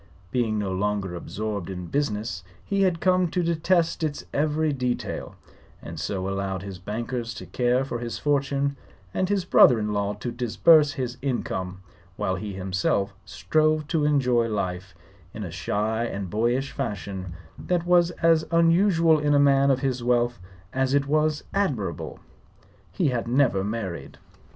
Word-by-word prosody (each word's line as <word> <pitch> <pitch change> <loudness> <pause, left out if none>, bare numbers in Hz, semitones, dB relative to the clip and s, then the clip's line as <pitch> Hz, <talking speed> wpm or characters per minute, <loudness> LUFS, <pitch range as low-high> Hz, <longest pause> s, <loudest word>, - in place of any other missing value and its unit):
Being 115 -4 0
no 100 -2 -2
longer 100 -1 -1
absorbed 100 +2 -4
in 90 -2 -5
business, 105 - -2 0.2
he 200 -1 0
had 180 -3 +2
come 185 -1 +3
to 175 +2 -1
detest 170 +1 +1
its 150 -2 -2
every 155 +1 +1
detail, 125 -2 -3 0.4
and 80 -1 -8
so 95 +4 -2
allowed 95 -1 -3
his 95 -2 -7
bankers 115 +4 -4
to 95 - -8
care 125 +7 +1
for 120 -3 -4
his 120 -1 -4
fortune 140 -1 0 0.4
and 185 - 0
his 200 -3 0
brother 125 -8 +6
in 105 -1 -2
law 100 0 0
to 110 +4 -5
disburse 145 +6 +4
his 125 -3 -4
income, 95 -8 -3 0.3
while 95 - -1
he 100 +2 -4
himself 95 +1 -1
strove 155 -1 +1
to 160 -2 +1
enjoy 125 -5 +2
life 95 -3 -3 0.4
in 105 - -5
a 90 - -6
shy 105 +7 -1
and 100 -5 -5
boyish 120 +5 0
fashion 95 -3 -4 0.3
that 175 -1 -1
was 175 -1 +4
as 165 -1 +5
unusual 165 -1 +4
in 145 0 +2
a - - +5
man 140 -1 +4
of 135 -1 +2
his 130 -3 -1
wealth 120 -2 +1 0.3
as 130 +1 +1
it 140 0 +2
was 155 +1 +1
admirable. 145 - -2 0.7
He 175 -7 +1
had 120 -2 -2
never 120 -6 +2
married. 100 -4 -5
125 Hz, 155 wpm, -25 LUFS, 100-150 Hz, 0.7 s, brother